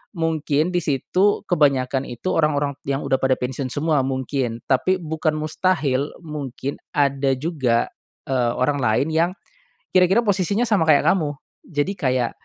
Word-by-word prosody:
mungkin 160 -1 0
di - - +4
situ, 180 +8 +1
kebanyakan 140 -5 +2
itu, 120 +10 -3
orang-orang 145 -3 +1
yang 140 0 0
udah - - +2
pada 135 -1 +3
pensiun 130 +1 -3
semua, 150 0 +1
mungkin. 130 -3 -2
Tapi, 185 +8 +2
bukan 155 -1 -1
mustahil, 155 -3 0
mungkin 140 -3 -5 0.2
ada 140 -1 +2
juga, 130 -6 0 0.4
eee, 125 -3 +1
orang 140 +3 +1
lain 110 +6 +2
yang 165 +2 +3 0.7
kira-kira 185 +5 +5
posisinya 200 +2 +1
sama, 200 -8 +2
kayak 145 -2 +5
kamu. 150 -6 +2 0.3
Jadi 150 +4 -1
kayak, 130 -4 +1
145 Hz, 140 wpm, -22 LUFS, 130-165 Hz, 0.7 s, kira-kira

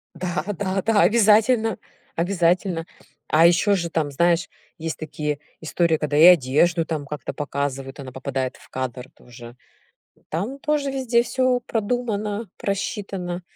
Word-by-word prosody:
Да, 175 -3 -3
да, 195 -1 -1
да, 220 0 +3
обязательно 220 0 +4 0.4
обязательно. 175 -1 +1 0.4
А 160 +2 +5
ещё 185 +4 +4
же 170 -2 -2
там, 155 -3 -1
знаешь, 170 +4 +2 0.3
есть 160 -1 -4
такие 150 -1 -4 0.2
истории, 160 0 +1
когда 150 -1 -2
и 155 - +6
одежду, 165 +1 +5
там, 155 -3 -4
как-то 145 -2 -6
показывают, 140 -1 -4
она 130 -2 -8
попадает 130 -1 -3
в - - -19
кадр 130 -1 -5
тоже. 120 0 -13 0.7
Там 205 - -3
тоже 295 -2 0
везде 250 -3 +2
всё 255 0 +1
продумано, 215 -2 -2
просчитано. 195 -3 -3
170 Hz, 135 wpm, -23 LUFS, 150-210 Hz, 0.7 s, и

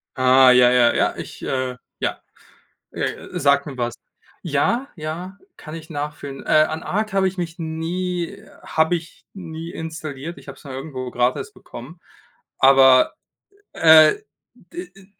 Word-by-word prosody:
Ah 130 0 +6
ja, 125 0 +6
ja, 120 -1 +4
ja, - - +1
ich, - - -9
äh 130 -1 -2 0.2
ja. - - -3 0.7
Äh, - - -4
sagt 140 0 +3
mir 140 -3 -8
was. 120 -1 -2 0.5
Ja, 190 - 0
ja, 170 +4 -6 0.2
kann 155 +1 -10
ich 160 0 -10
nachfühlen. 145 -2 -6
Äh, - - -8
an 155 +1 +3
ARC 215 +1 -2
habe 195 -1 +2
ich 190 +1 -5
mich 170 -1 -5
nie 170 +3 -3 0.3
habe 160 +2 +1
ich 165 0 -9
nie 165 -3 -8
installiert. 160 -1 -7
Ich 140 0 -15
habe 135 - -9
es - - -18
mal 140 -3 -8
irgendwo 130 -2 -6
gratis 125 +1 -1
bekommen. 145 +9 -12 0.6
Aber, 130 -1 +6 0.6
äh, 160 -1 +7 0.4
d 355 +1 -10
d 195 -1 -17
155 Hz, 150 wpm, -21 LUFS, 135-170 Hz, 0.7 s, äh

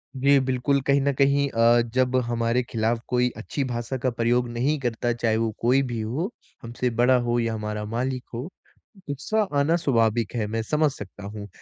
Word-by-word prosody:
जी, 140 +2 +4
बिल्कुल 130 +1 +1
कहीं 140 0 +4
न 140 +1 +2
कहीं 140 +1 +3
अ, 115 0 +4
जब 130 0 +2
हमारे 115 +1 0
ख़िलाफ़ 115 0 -1
कोई 125 0 +2
अच्छी 135 +5 -3
भाषा 120 +2 -3
का 130 +1 0
प्रयोग 120 +1 +2
नहीं 130 +6 0
करता 120 -1 -1
चाहे 115 -2 0
वो 115 -1 0
कोई 125 +3 +4
भी 115 - -3
हो, 145 - -2 0.3
हमसे 120 +2 -2
बड़ा 125 +1 +5
हो 120 0 0
या 115 -1 0
हमारा 105 -1 -4
मालिक 130 +1 -2
हो, 120 - -4 0.7
गुस्सा 145 +11 -1 0.2
आना 155 +4 +3
स्वाभाविक 115 -8 +1
है, 110 -3 -1
मैं 115 +2 -2
समझ 150 +3 +1
सकता 100 -4 -10
हूँ। 100 0 -7
120 Hz, 185 wpm, -25 LUFS, 115-135 Hz, 0.7 s, बड़ा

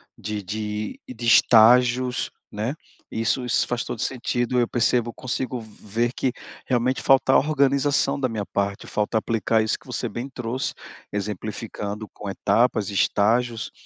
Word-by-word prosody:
de 105 0 -5
de 105 +1 -4
de 120 -2 -6
estágios, 125 +2 +5 0.2
né, 110 +7 -3 0.3
isso 115 +3 0
isso 125 - +1
faz 120 -1 -1
todo - - -6
sentido, 125 0 -1
eu 120 - +2
percebo 120 0 +1
eu - - -7
consigo 130 -1 -3
ver 110 +1 -3
que, 130 -1 0 0.4
realmente, 125 +1 +1
falta 135 0 +4
organização 140 -1 +2
da 130 -2 0
minha 110 -3 -3
parte, 100 0 -2
falta 105 +2 -1
aplicar 110 0 +1
isso 110 - 0
que - - -21
você 125 0 -3
bem 120 +5 -5
trouxe, 125 0 -3 0.4
exemplificando 105 +1 -4
com 100 - -7
etapas, 105 +2 +1
estágios, 115 +4 +1
115 Hz, 145 wpm, -24 LUFS, 105-125 Hz, 0.4 s, estágios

